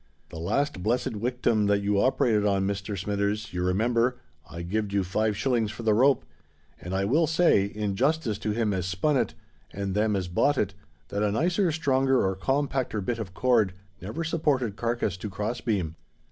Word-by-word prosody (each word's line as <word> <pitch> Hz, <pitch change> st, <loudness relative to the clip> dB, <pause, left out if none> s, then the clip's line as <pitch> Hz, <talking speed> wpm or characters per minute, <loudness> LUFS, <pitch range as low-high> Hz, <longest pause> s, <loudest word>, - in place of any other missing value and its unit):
"The 80 Hz, -, -8 dB
last 95 Hz, -, -1 dB
blessed 115 Hz, +4 st, 0 dB
wictim 115 Hz, -1 st, 0 dB
that 100 Hz, 0 st, +2 dB
you 100 Hz, 0 st, +2 dB
operated 115 Hz, -5 st, +2 dB
on, 100 Hz, -2 st, +2 dB
Mr. 100 Hz, 0 st, -3 dB
Smithers, 100 Hz, +2 st, -2 dB
you 90 Hz, -, -2 dB
remember, 115 Hz, +6 st, +1 dB, 0.3 s
I 85 Hz, -, -6 dB
gived 100 Hz, +3 st, -2 dB
you 100 Hz, -1 st, +2 dB
five 105 Hz, +3 st, 0 dB
shillings 120 Hz, -4 st, +1 dB
for 115 Hz, -, -7 dB
the 110 Hz, -1 st, +3 dB
rope; 130 Hz, -, +3 dB, 0.6 s
and 90 Hz, +1 st, -4 dB
I 95 Hz, +1 st, +1 dB
will 155 Hz, +10 st, +3 dB
say, 160 Hz, -, +4 dB
in 105 Hz, -1 st, -3 dB
justice 135 Hz, -3 st, 0 dB
to 110 Hz, -, -3 dB
him 105 Hz, -1 st, 0 dB
as 90 Hz, -2 st, -2 dB
spun 100 Hz, +11 st, +1 dB
it 130 Hz, -, 0 dB, 0.4 s
and 100 Hz, -1 st, -3 dB
them 105 Hz, +1 st, +1 dB
as 95 Hz, -2 st, -2 dB
bought 135 Hz, +11 st, +2 dB
it, 100 Hz, -4 st, 0 dB, 0.4 s
that 100 Hz, -, -2 dB
a 105 Hz, -1 st, +2 dB
nicer, 175 Hz, -, +1 dB
stronger, 135 Hz, -5 st, +2 dB
or 95 Hz, 0 st, 0 dB
compacter 135 Hz, +1 st, -1 dB
bit 115 Hz, +4 st, -2 dB
of 95 Hz, -4 st, -6 dB
cord 115 Hz, -7 st, +3 dB, 0.3 s
never 110 Hz, -, -4 dB
supported 145 Hz, -9 st, 0 dB
carkiss 115 Hz, -4 st, -1 dB
to 105 Hz, +3 st, -5 dB
cross 105 Hz, +5 st, -3 dB
beam. 95 Hz, -9 st, -1 dB
105 Hz, 190 wpm, -27 LUFS, 100-130 Hz, 0.6 s, say